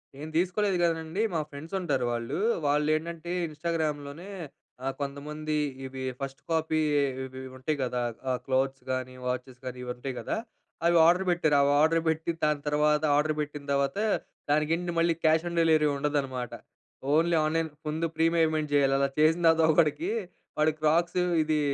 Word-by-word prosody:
నేను 150 +3 -8
తీసుకోలేదు 185 +2 +1
గాదండీ, 165 +4 0
మా 165 - +1
ఫ్రెండ్స్ 150 +5 -10
ఉంటారు 140 -9 0
వాళ్ళు. 120 +3 -3 0.3
వాళ్ళు 150 +1 +2
ఏంటంటే 170 +2 -5 0.2
ఇన్‌స్టాగ్రామ్‍లోనే 155 +1 -3 0.7
కొంతమంది, 150 +2 -4 0.3
ఇవి 130 0 -6 0.2
ఫస్ట్ 135 0 -6
కాపీ 160 -1 +1 0.4
ఇవి 130 0 -8 0.2
ఉంటాయి 145 +4 -2
కదా! 125 -1 -1 0.4
క్లోత్స్ 135 +1 0
కాని 130 0 -3
వాచెస్ 125 0 -4
కాని 125 0 -5
ఇవి 125 - -4
ఉంటాయి 130 +2 -5
కదా! - - -2 0.5
అవి 170 0 +5
ఆర్డర్ 180 +3 +4
పెట్టారు. 165 -4 +2
అవి 140 0 +3
ఆర్డర్ 165 +1 +3
పెట్టి, 160 +1 0
దాని 150 -1 +2
తర్వాత 150 +1 +2
ఆర్డర్ 150 +1 +2
పెట్టిన 150 -1 -5
తర్వాత 140 +3 +1 0.5
దానికండి 165 +4 +1
మళ్ళీ 170 0 +3
క్యాష్ 160 +1 +3
ఆన్ 170 - -5
డెలివరీ 160 -2 +4
ఉండదనమాట. 140 -4 -2 0.6
ఓన్లీ 165 +2 +3
ఆన్లైన్ 160 +1 0 0.2
ముందు 155 +2 -1
ప్రీ 160 - +2
పేమెంట్ 155 -2 +2
చేయాలి. 140 -1 +4
అలా 140 0 +2
చేసిన 160 +3 +4
తర్వాత 165 0 +5
ఒకడికి 155 +3 +2 0.5
వాడు 155 +1 +3
క్రాక్స్ 165 +3 +2 0.2
ఇది 155 0 +1
155 Hz, 150 wpm, -28 LUFS, 140-165 Hz, 0.7 s, అవి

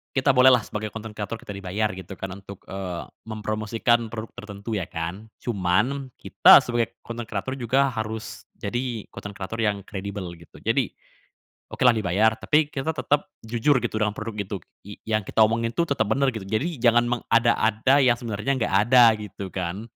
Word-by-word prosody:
kita 135 +1 +2
bolehlah, 125 -2 +6
sebagai 105 0 -5
content 110 0 -6
creator, 105 +2 -4
kita 100 - -8
dibayar, 100 +3 -1
gitu 95 +1 -8
kan, 95 0 -6
untuk, 100 -1 -11
eee, 95 -3 -4 0.2
mempromosikan 110 +1 -1
produk 110 -1 -5
tertentu, 105 0 -5
ya 95 - -2
kan. 85 +5 -5 0.2
Cuman, 120 +6 0
kita - - +7
sebagai 120 -2 -1
content 115 0 -6
creator 110 +5 -4
juga 135 +3 +2
harus 110 -2 -5
jadi 120 +1 -4
content 100 - -8
creator 100 +3 -6
yang 105 -3 0
kredibel, 95 -1 -6
gitu. 85 - -16
Jadi, - - 0 0.7
okelah 125 - +4
dibayar, 110 0 +2
tapi 150 +5 +2
kita 155 +3 -2
tetap 145 -1 0 0.2
jujur, 120 +6 +2
gitu, 110 -2 -2
dengan 105 -1 0
produk 105 -1 -6
itu 100 0 -3 0.3
y 105 - -8
yang 110 -3 -1
kita 110 - +4
omongin 115 +1 +1
tuh 170 - +2
tetap 110 -6 +1
benar, 135 +3 +2
gitu. 110 -4 -7
Jadi, 135 - -2
jangan 120 0 +4
mengada-ada 115 +2 +3
yang 125 -3 +4
sebenarnya 115 +3 -2
nggak 120 -6 -1
ada, 125 -1 +8
gitu 100 -2 -7
kan. 95 +2 -4
110 Hz, 170 wpm, -24 LUFS, 100-120 Hz, 0.7 s, ada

